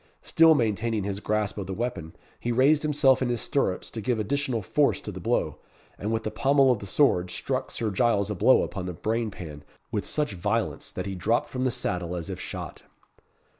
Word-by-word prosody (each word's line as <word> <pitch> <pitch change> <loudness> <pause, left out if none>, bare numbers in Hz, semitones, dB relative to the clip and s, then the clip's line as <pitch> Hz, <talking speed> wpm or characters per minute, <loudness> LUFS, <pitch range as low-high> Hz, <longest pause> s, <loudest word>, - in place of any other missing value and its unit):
Still 160 -1 +5
maintaining 110 -3 0
his 100 0 -3
grasp 105 0 -1
of 95 - -5
the 95 - -4
weapon, 95 -9 -4 0.2
he 120 - -2
raised 140 +5 +4
himself 145 -4 +3
in 130 - +1
his 120 -1 0
stirrups 100 -9 -1
to 115 - -5
give 120 +3 0
additional 120 +1 -1
force - - +2
to - - -6
the - - -7
blow, - - -1 0.4
and 105 +3 -3
with 110 0 -1
the 110 - -3
pummel 135 +3 +4
of 120 - 0
the 100 - -8
sword, 90 -8 +3
struck 130 +6 -3
Sir 110 -2 -2
Giles 105 -1 +2
a - - -2
blow - - +5
upon 95 -2 -5
the 90 - -5
brainpan 100 -9 -3 0.3
with 105 - -2
such 150 -1 -1
violence, 105 +4 -2
that - - -5
he 100 - -3
dropped 110 +6 0
from 130 0 -2
the - - +3
saddle 90 -8 -2
as 85 -2 -5
if - - -6
shot. - - -6
110 Hz, 205 wpm, -26 LUFS, 100-130 Hz, 0.4 s, Still